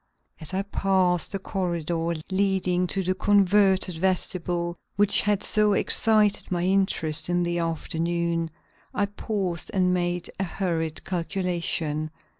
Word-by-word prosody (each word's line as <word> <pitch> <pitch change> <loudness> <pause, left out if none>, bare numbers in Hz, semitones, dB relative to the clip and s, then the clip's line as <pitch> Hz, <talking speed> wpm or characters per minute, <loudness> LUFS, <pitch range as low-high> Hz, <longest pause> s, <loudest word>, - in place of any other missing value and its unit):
As 155 - -7
I 195 +1 -1
passed 190 -3 +1
the 195 - -1
corridor 170 -4 -2 0.2
leading 190 -2 +1
to 195 +2 -1
the 185 +1 +1
converted 190 -3 +3
vestibule 175 -1 -1 0.2
which 205 0 +4
had 205 -1 +1
so 210 -1 +3
excited 210 0 +2
my 175 -1 0
interest 180 -5 0
in 175 0 +1
the 175 0 -1
afternoon, 165 0 -1 0.5
I 205 - +2
paused 200 -4 -3
and 180 -1 +3
made 175 -1 -1
a - - +1
hurried 170 -4 -2
calculation. 170 -4 -2
180 Hz, 125 wpm, -25 LUFS, 170-195 Hz, 0.5 s, which